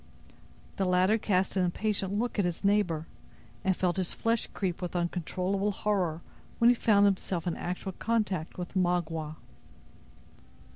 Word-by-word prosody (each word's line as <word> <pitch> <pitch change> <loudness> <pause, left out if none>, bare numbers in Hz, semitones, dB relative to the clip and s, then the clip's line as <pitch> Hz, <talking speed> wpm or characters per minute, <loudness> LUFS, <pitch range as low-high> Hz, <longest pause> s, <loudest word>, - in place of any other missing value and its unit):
The 195 - +1
latter 185 +4 +3
cast 190 -3 +1
an 190 - +3
impatient 195 +2 -1
look 235 0 -1
at - - +4
his 175 +1 -3
neighbor, 195 -6 +2 0.6
and 190 -2 +2
felt 180 0 0
his 185 -2 -1
flesh 230 0 0
creep 185 -3 -2
with 180 0 -4
uncontrollable 185 +3 -1
horror 185 -6 -1 0.3
when 235 0 +6
he - - +3
found 205 -3 +4
himself 185 -3 0
in 175 - -1
actual 180 +2 -4
contact 205 -5 -1
with 180 -1 -5
Magua. 165 -4 0
185 Hz, 145 wpm, -29 LUFS, 175-205 Hz, 0.6 s, when